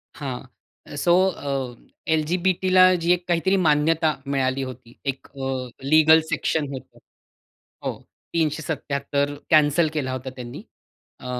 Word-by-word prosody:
हां. 135 -3 -5 0.5
सो 170 - +2 0.2
अ, 135 -6 -4 0.4
एल-जी-बी-टीला 185 +3 +3
जी 170 +1 +2
एक 180 0 -3
काहीतरी 175 +3 +2
मान्यता 155 0 +3
मिळाली 135 -1 0
होती. 125 -2 -9
एक 135 -1 -4
अ, 135 -2 -4
लीगल 155 +2 +6
सेक्शन 155 -3 0
होतं. 130 - -10 0.9
हो, - - 0 0.4
377 145 -2 -1
कॅन्सल 155 +1 +4
केला 135 -4 -2
होता 130 +1 -5
त्यांनी. 120 -1 -8 0.6
अ, - - -13
145 Hz, 115 wpm, -23 LUFS, 135-165 Hz, 0.9 s, लीगल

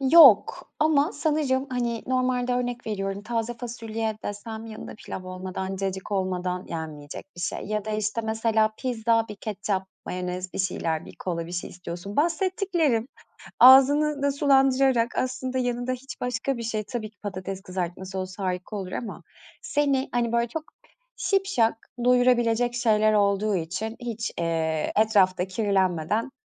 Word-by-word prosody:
Yok. 335 - +7
Ama 300 -1 +3
sanırım, 295 -3 0
hani, 235 -2 -1
normalde 255 -1 +1
örnek 245 -1 -2
veriyorum, 195 -2 -3
taze 230 +1 -2
fasulye 225 -2 -4
desem 220 +2 -6
yanında 220 -1 -8
pilav 190 -3 -7
olmadan, 185 +1 -5
cacık 190 +1 -3
olmadan 185 -1 -1
yenmeyecek 155 -3 -6
bir - - -7
şey. 175 - -2
Ya 210 0 -2
da, 215 - -4
işte, 215 +1 -1
mesela 220 0 +2
pizza, 230 -2 +1
bir 210 - -7
ketçap, 200 -2 -3 0.2
mayonez, 180 0 -4
bir - - -5
şeyler, 165 -4 -1
bir - - -12
kola, 170 -2 -3
bir 175 - -9
şey 180 - -4
istiyorsun. 180 +2 -7
Bahsettiklerim, 330 - +1 0.5
ağzını 280 +3 +7
da 280 0 +2
sulandırarak, 270 -3 +3
aslında 255 0 -1
yanında 245 0 -1
hiç 255 +1 -7
başka 250 +2 -1
bir 235 - -5
şey, 220 -1 -2
tabii 220 -1 -5
ki 210 - -35
patates 195 -1 -5
kızartması 185 +1 -4
olsa 185 +1 -5
harika 180 +3 -3
olur 190 -3 -5
ama, 230 - -5 0.4
seni, 285 - +1
hani, 240 -1 0
böyle 235 0 +2
çok 310 +6 -5 0.5
şipşak 385 - +1 0.2
doyurabilecek 245 -1 +3
şeyler 215 -3 +3
olduğu 205 0 +2
için 185 +6 -3
hiç, 235 -2 -4
eee, 160 -2 0
etrafta 195 -4 +3
kirlenmeden. 190 +1 0
220 Hz, 145 wpm, -26 LUFS, 190-250 Hz, 0.5 s, Yok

